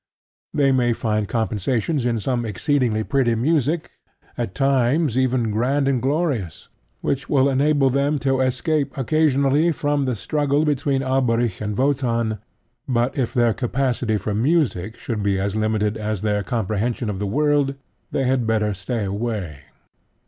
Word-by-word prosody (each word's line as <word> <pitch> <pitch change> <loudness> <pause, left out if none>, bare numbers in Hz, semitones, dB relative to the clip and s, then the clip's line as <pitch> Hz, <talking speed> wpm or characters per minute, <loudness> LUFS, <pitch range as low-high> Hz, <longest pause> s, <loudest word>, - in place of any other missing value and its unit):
They 140 -2 +2
may 125 -2 +2
find 110 -2 -1
compensations 120 - -1
in 115 -2 0
some 120 +2 -1
exceedingly 115 +1 0
pretty 130 -2 +1
music, 155 +5 0 0.4
at 95 - -4
times 135 - +2
even 130 -3 +1
grand 135 +6 +1
and 130 -3 +1
glorious, 135 - -2 0.3
which 135 0 -2
will 135 -1 +4
enable 140 0 +2
them 140 +3 +1
to 135 -1 +2
escape 140 +3 0
occasionally 145 +2 +2
from 145 -2 0
the 130 -2 -1
struggle 145 +6 0
between 140 -2 0
Alberic 120 -6 0
and 105 -1 -3
Wotan; 120 -5 0 0.5
but 125 -1 0
if 125 -5 -1
their 120 -2 +2
capacity 125 -3 -1
for 105 +1 -3
music 110 - 0
should 110 -3 -4
be 100 -1 +1
as 100 +1 -2
limited 110 0 0
as 105 -2 -3
their 105 -1 +1
comprehension 110 +3 -2
of 100 -3 -3
the 105 - -2
world, 145 +3 +1 0.3
they 135 - -1
had 125 -2 +1
better 105 -2 +1
stay 105 +3 -3
away. 100 - -3
125 Hz, 150 wpm, -22 LUFS, 110-140 Hz, 0.5 s, will